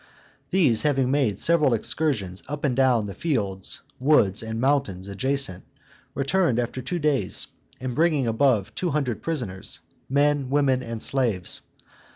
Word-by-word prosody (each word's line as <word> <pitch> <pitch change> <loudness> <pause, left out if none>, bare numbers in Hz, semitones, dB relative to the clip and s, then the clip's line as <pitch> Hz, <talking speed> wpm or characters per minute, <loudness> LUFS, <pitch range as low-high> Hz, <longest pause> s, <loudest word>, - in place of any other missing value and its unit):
These 140 - +3
having 135 -3 +2
made 130 -9 +1
several 155 -3 +3
excursions 110 - -2
up 150 0 -5
and 130 -3 +1
down 125 -4 +3
the 100 - -6
fields, 100 - -2 0.2
woods, 125 -8 +3
and 110 0 -4
mountains 125 -9 0
adjacent, 130 -1 -1 0.5
returned 140 -1 +1
after 125 +1 -2
two 135 +8 -3
days, 150 -4 +1 0.3
bringing 140 +3 +1
above 115 -3 +2
two 180 - -2
hundred 140 -7 -1
prisoners, 120 - -3 0.3
men, 145 -1 +2
women, 135 -2 +2
and 115 -3 -5
slaves. 115 -10 -1
130 Hz, 135 wpm, -25 LUFS, 110-145 Hz, 0.5 s, These